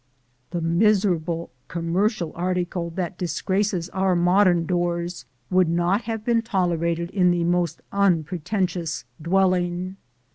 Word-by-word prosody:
The 175 - -3
miserable 170 -2 +1 0.2
commercial 170 +3 -1
article 175 -1 -2
that 180 -2 -3
disgraces 185 +1 -1
our 190 -1 +1
modern 175 0 +4
doors 175 -3 -2 0.3
would 185 -2 +4
not 175 +6 +1
have 225 -1 -4
been 235 -1 +3
tolerated 170 -4 -1
in 180 -3 +3
the 175 -1 +1
most 175 0 0
unpretentious 180 - 0 0.2
dwelling. 180 +1 +1
180 Hz, 110 wpm, -24 LUFS, 170-190 Hz, 0.3 s, modern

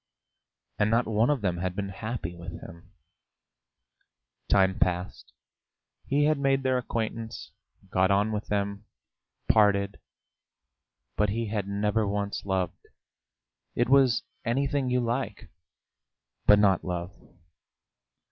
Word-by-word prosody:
And 105 - +3
not 115 +2 +2
one 110 +3 +2
of 145 -5 +1
them 90 -4 0
had 90 +1 -3
been 100 -1 -3
happy 105 -3 -5
with 85 +1 -8
him. 85 +1 -13 1.6
Time 95 -1 +3
passed, 90 +1 -1 0.8
he 145 +2 +2
had 150 -1 +2
made 135 -1 +2
their 130 -1 +2
acquaintance, 115 -1 -4 0.4
got 95 0 +3
on 100 +2 +2
with 105 0 -3
them, 100 0 -2 0.6
parted, 100 -2 +3 1.2
but 105 -1 +2
he 115 +1 -2
had 105 -2 -2
never 105 +1 0
once 100 0 -3
loved; 95 -2 -2 0.9
it 120 +1 +1
was 135 -3 +4 0.2
anything 135 +2 0
you 125 0 +2
like, 120 -2 -3 1.0
but 105 - +8
not 100 -3 +3
love. 90 +1 -4
105 Hz, 120 wpm, -27 LUFS, 100-120 Hz, 1.6 s, but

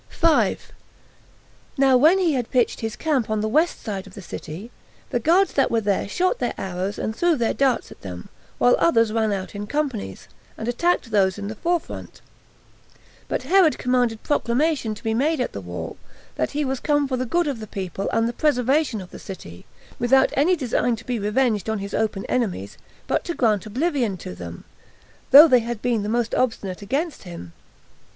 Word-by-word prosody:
5. 330 -2 +1 1.1
Now 270 -1 +5
when 310 +9 +6
he 355 -5 +2
had 245 -4 -2
pitched 245 -2 +1
his 225 -1 -4
camp 280 -9 0
on 215 -1 0
the 215 - 0
west 310 +10 +1
side 195 -3 -5
of 190 - -14
the 200 - -8
city, 170 +7 -8 0.4
the 245 - +1
guards 350 - +3
that 275 - +2
were 230 - +2
there 200 -2 -1
shot 370 - 0
their - - -2
arrows 190 +1 -3
and 220 - -3
threw 345 +3 +2
their 235 -5 0
darts 270 -2 +1
at - - -14
them, 90 -2 -8 0.3
while 245 - +5
others 230 -9 +3
ran 220 -1 +1
out 190 -2 -4
in 205 0 -5
companies, 280 -5 -3 0.3
and 225 - -5
attacked 245 0 0
those 190 -2 +2
in 200 0 -5
the - - -4
forefront; 345 +7 -3 1.1
but - - -2
Herod 340 +2 +4
commanded 245 -3 0
proclamation 270 -3 0
to - - -14
be 225 - 0
made 290 +6 +1
at 250 - -2
the 100 - -5
wall, 90 -1 -6 0.4
that 125 - -1
he 295 0 0
was 265 -1 -2
come 290 -2 +1
for 260 - -1
the 255 - -1
good 345 +8 +1
of 280 -6 -3
the 215 - -7
people 195 0 -4
and 225 0 +1
the 235 - -3
preservation 265 -3 +1
of 180 - -11
the - - -10
city, 85 - -10 0.3
without 265 +2 +4
any 315 +7 +3
design 245 -4 0
to 225 - -13
be 245 -2 -2
revenged 210 -1 0
on 220 - 0
his 200 0 -6
open 210 -3 -1
enemies, 195 - -2 0.3
but - - 0
to 345 - -3
grant 215 -4 +1
oblivion 250 - -1
to 90 - -8
them, 85 -1 -9 0.7
though 295 +4 +10
they 255 -4 +5
had 235 -1 -4
been 235 -2 0
the 205 - -3
most 235 0 0
obstinate 210 -7 -1
against 280 - -2
him. 170 - -9
235 Hz, 195 wpm, -23 LUFS, 205-280 Hz, 1.1 s, though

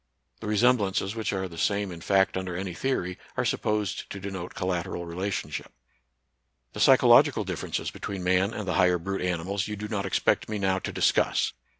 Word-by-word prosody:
The - - -6
resemblances, 105 -3 +2
which 110 -1 -2
are 95 -1 -2
the 85 -2 -9
same 100 -2 0
in 85 -1 -9
fact 95 +2 +2
under 95 -2 -3
any 95 -1 -4
theory, 90 -4 -2 0.2
are - - +1
supposed 105 -3 -1
to 100 - -6
denote 95 -2 -6
collat 90 -2 -1
eral 85 - -5
relationship. 85 -3 -4 1.0
The - - -7
psychological - - +6
differences - - -3
between 95 -2 -5
man 95 +3 +2
and 105 -3 -5
the 90 - 0
higher 90 -1 +4
brute 95 +3 -4
animals 90 +2 -1
you 105 - -4
do 105 +1 -5
not 100 -3 -2
expect 95 - +1
me 110 - -2
now 95 -1 +1
to - - -5
discuss. - - +2
95 Hz, 185 wpm, -27 LUFS, 90-100 Hz, 1.0 s, psychological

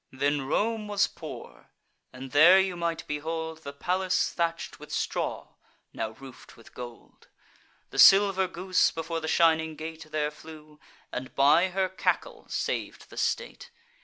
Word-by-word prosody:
Then 140 +1 -1
Rome 215 +6 0
was 205 -1 +2
poor; - - -10 0.4
and 130 0 -9
there 170 +7 +7
you 190 -1 0
might 170 -1 -3
behold 160 +2 -4
The 140 -3 -8
palace 185 +6 0
thatch'd 170 -1 -2
with - - -12
straw, - - -3 0.4
now 110 - -3
roof'd 130 +3 -13
with 115 - -18
gold. 120 -1 -11 0.6
The - - -4
silver 195 -1 +7
goose 185 +1 +1
before 165 0 -4
the 160 - -5
shining 160 -1 +3
gate 160 0 -8
There 150 -1 -1
flew, 155 -1 -14 0.3
and, 130 +1 -6
by 150 +6 +5
her 190 +1 0
cackle, 190 - -2
sav'd - - -4
the - - -12
state. 485 0 -2
160 Hz, 145 wpm, -27 LUFS, 150-185 Hz, 0.6 s, there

